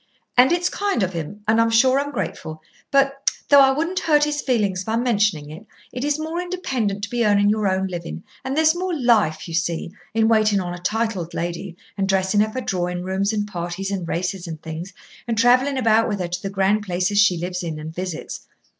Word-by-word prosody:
"And 250 +4 +6
it's 350 0 +2
kind 400 - -1
of 185 0 -2
him, 170 +6 -6
and 225 +1 +4
I'm 230 - +3
sure 255 +4 +4
I'm 285 +1 -3
grateful. 160 - -5 0.3
But 275 0 +2 0.2
though 285 - +8
I 270 - +6
wouldn't 330 +7 0
hurt 295 -2 +3
his 295 0 0
feelings 205 -7 0
by 220 +3 -2
mentioning 210 -11 +1
it 175 +8 -11 0.2
it 250 +1 -5
is 290 0 +1
more 320 +3 -3
independent 255 - -2
to 220 - -3
be 240 -1 +1
earning 205 -1 +4
your 215 -1 0
own 190 0 +1
living, 175 -2 -6 0.2
and 265 +2 -3
there's 315 0 +5
more 350 -2 -3
life, 220 - +2
you 165 - -7
see, 170 0 -1 0.2
in 220 0 +3
waiting 215 -2 +3
on 175 -2 -4
a 175 - -7
titled 205 -3 -2
lady 175 +1 -4 0.2
and 195 0 0
dressing 190 +1 +2
her 215 - +1
for 255 +4 -4
drawing 180 -4 -2
rooms 190 +2 0
and 210 -1 -1
parties 175 +1 -4
and 185 -4 -3
races 180 +1 -3
and 160 -2 -7
things, 165 +3 -6 0.4
and 230 -1 -1
travelling 255 +4 +4
about 225 -2 +3
with 205 - -2
her 175 -1 -3
to 180 +1 -4
the 195 - -4
grand 195 +2 +1
places 185 +1 0
she 205 -4 +4
lives 180 +1 -3
in 165 -3 -4
and 155 +1 -7
visits. 180 -1 -6
205 Hz, 215 wpm, -22 LUFS, 180-250 Hz, 0.4 s, though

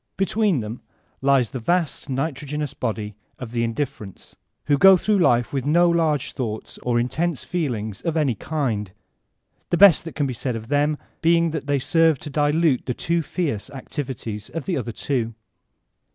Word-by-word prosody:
Between 195 - +1
them 110 +3 -6 0.4
lies 135 -4 +3
the 130 - -4
vast 165 +3 -1
nitro* 140 +2 -2
genoos 150 -1 -3
body 110 -5 -3 0.2
of 125 -3 -7
the 120 -1 0
indifferents, 115 -5 -5 0.3
who 145 -1 +2
go 195 +2 +8
through 210 +2 +1
life 120 -8 +3
with 135 -2 -1
no 170 +5 +4
large 160 -5 +1
thoughts 110 -5 -5
or 120 -1 0
intense 140 +3 -1
feelings 115 - -3
of 165 -1 -1
any 145 -5 +2
kind, 110 - -2 0.8
the 175 - +1
best 195 -3 +7
that 165 - -7
can 145 - 0
be 130 - -2
said 125 +1 -3
of 115 +1 -7
them 145 +1 +2 0.2
being 170 0 +3
that 155 -2 -4
they 145 0 +2
serve 165 +2 +3
to 150 - -9
dihite 150 -1 +2
the 125 - -2
too 170 0 0
fierce 145 - -3
activities 125 -6 -6
of 165 -3 -5
the 185 - -1
other 120 -5 -3
two. 115 -1 -2
140 Hz, 175 wpm, -23 LUFS, 120-165 Hz, 0.8 s, go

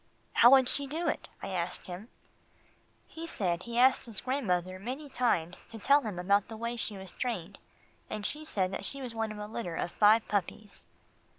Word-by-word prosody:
"How 240 - +8
would 265 -1 +7
she 280 +1 +1
do 325 +5 -2
it?" - - -2
I - - -3
asked 180 -2 -2
him. 185 +4 -7 1.0
He 330 +1 -8
said 180 - -1
he 235 +4 -7
had 245 +2 +7
asked 255 - -4
his 225 -4 +1
grandmother 185 -9 -1
many 260 +8 -5
times 190 -10 0
to 225 - -7
tell 280 +7 +5
him 215 -8 -5
about 200 +3 +2
the 220 - -8
way 235 +1 -3
she 215 -3 -3
was 190 -1 -7
trained, 200 -7 -4 0.5
and 210 -1 -4
she 300 +6 -3
said 190 -11 0
that - - -4
she 275 - -4
was 250 -3 -5
one 225 -1 -2
of 215 - -7
a 210 - -5
litter 210 -5 -4
of 175 - -2
five 215 +2 +5
puppies. 205 +1 -2
220 Hz, 205 wpm, -31 LUFS, 190-255 Hz, 1.0 s, How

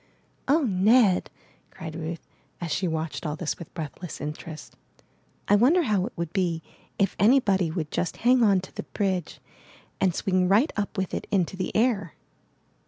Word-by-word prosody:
*'0h, 290 0 +3
Ned," 200 0 +4 0.4
cried 160 -1 -8
Ruth, 165 0 -6 0.3
as 170 -3 -4
she 185 - 0
watched 160 -1 -3
all 150 -2 -2
this 160 -1 -3
with 170 - -9
breathless 165 +1 -6
interest, 150 +1 -7 0.7
'1 205 - +5
wonder 320 - +5
how 205 -7 +1
it - - -9
would 170 -1 -4
be 175 -5 0 0.3
if 195 -2 +1
anybody 200 -6 +4
would 155 -2 -4
just 175 - -2
hang 250 0 +5
on 200 -4 +4
to 190 - -12
the - - -4
bridge 185 -5 -2 0.6
and 185 -3 +2
swing 185 -1 +1
right 215 - +3
up 205 0 -3
with 190 -1 -2
it - - -3
into 190 -2 0
the 185 - -3
air?'' 215 - +1
185 Hz, 170 wpm, -26 LUFS, 165-210 Hz, 0.7 s, 1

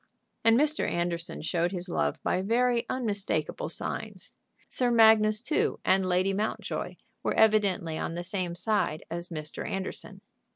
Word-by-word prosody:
And 225 0 +5
Mr. 305 +1 +2
Anderson 170 -1 -3
showed 170 +2 0
his 180 -1 -5
love 75 - -1
by 185 - 0
very 235 +3 +1
unmistakable 240 - -2
signs. - - -4 0.4
Sir 250 -1 +3
Magnus 220 -2 +5
too, 305 +5 0
and 190 0 +3
Lady 185 +1 +1
Mountjoy, 210 +3 -3 0.3
were - - -1
evidently 200 -7 +2
on 165 - -3
the 175 - -4
same 180 -1 -3
side 180 -4 -1
as 170 +1 -4
Mr. 155 -2 -5
Anderson. 195 0 -5
195 Hz, 140 wpm, -28 LUFS, 175-220 Hz, 0.4 s, And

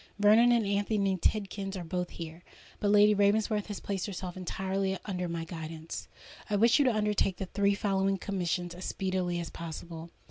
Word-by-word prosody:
Vernon 215 +4 +6
and 235 -3 +3
Anthony 200 -1 +1
Tidkins 195 +1 -1
are 180 - -4
both 180 +1 -3
here; 165 0 -8 0.4
but 205 - +1
Lady 210 +1 +6
Ravensworth 210 +1 +2
has 205 -2 -5
placed 195 -1 -3
herself 185 -2 -5
entirely 190 +1 -2
under 180 -3 -2
my 165 -1 -3
guidance. 160 -1 -7 0.4
"I 210 - +1
wish 230 +5 +5
you 285 - +4
to 255 - +4
undertake 210 -3 +1
the 190 - -3
three 200 +1 +1
following 195 -1 +1
commissions 180 -2 -2
as 180 +1 -7
speedily 185 -2 -1
as 170 - -5
possible. 165 0 -7
195 Hz, 175 wpm, -30 LUFS, 175-205 Hz, 0.4 s, Vernon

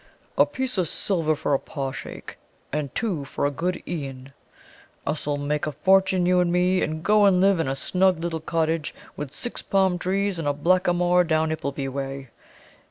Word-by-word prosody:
A - - +5
piece 260 -5 -2
of 180 - +1
silver 165 -3 0
for 145 - -1
a 135 - +3
paw 135 -3 -4
shake, - - -8 0.4
and 150 -3 -3
two 195 -11 -1
for 135 - -3
a 145 - +1
good 180 +6 -2
e'en. 135 -5 -6 0.7
Us 150 0 -3
'll 145 -1 0
make 145 +1 -1
a - - -1
fortune, 190 +3 +3
you 180 0 +4
and 175 -1 +2
me, 180 +1 +2
and 155 +1 -2
go 210 +1 +5
and 190 -2 +5
live 195 -1 +4
in 165 - 0
a 135 - -1
snug 185 +5 +1
little 165 -1 -2
cottage 160 -1 -1 0.2
with 145 -3 -6
six 240 - -6
palm 190 -2 +1
trees 195 0 -1
and 155 - -2
a 145 - +2
blackamoor 175 +2 +3
down 160 -1 +1
Ippleby 140 -3 -3
way. 135 -1 -5
165 Hz, 190 wpm, -24 LUFS, 145-185 Hz, 0.7 s, A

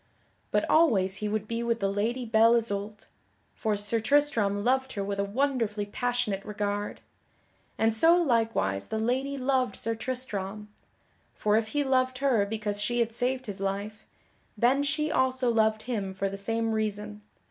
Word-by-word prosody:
But - - +1
always 205 - +3
he 210 - -3
would 215 0 -2
be 230 +1 -2
with 235 -1 0
the 195 - +1
Lady 225 +6 -1
Belle 225 +1 +5
Isoult, 210 -2 -2 0.5
for 215 -2 -1
Sir 205 +3 +1
Tristram 225 -6 +2
loved 265 +2 +1
her 200 - -3
with 200 0 -3
a - - +2
wonderfully 225 -2 -1
passionate 210 -2 -2
regard. 205 0 -3 0.8
And 225 0 +2
so 325 +10 +5
likewise 225 - +1
the - - -3
lady 260 +5 -1
loved 255 -1 0
Sir 230 - -1
Tristram. 215 -4 -5 0.7
For 210 0 +1
if 220 0 +1
he 290 +5 0
loved 255 -1 +1
her 250 -7 +2
because 210 -1 -3
she 240 +3 -1
had 230 -1 +1
saved 255 +2 -1
his 205 -2 -5
life, 200 +2 -4 0.5
then 250 +6 +3
she 300 +2 -1
also 260 -2 +2
loved 220 -1 +2
him 200 -6 -3
for 195 +1 -1
the 195 - -6
same 225 +3 -1
reason. 210 -1 -3
220 Hz, 165 wpm, -28 LUFS, 205-255 Hz, 0.8 s, Belle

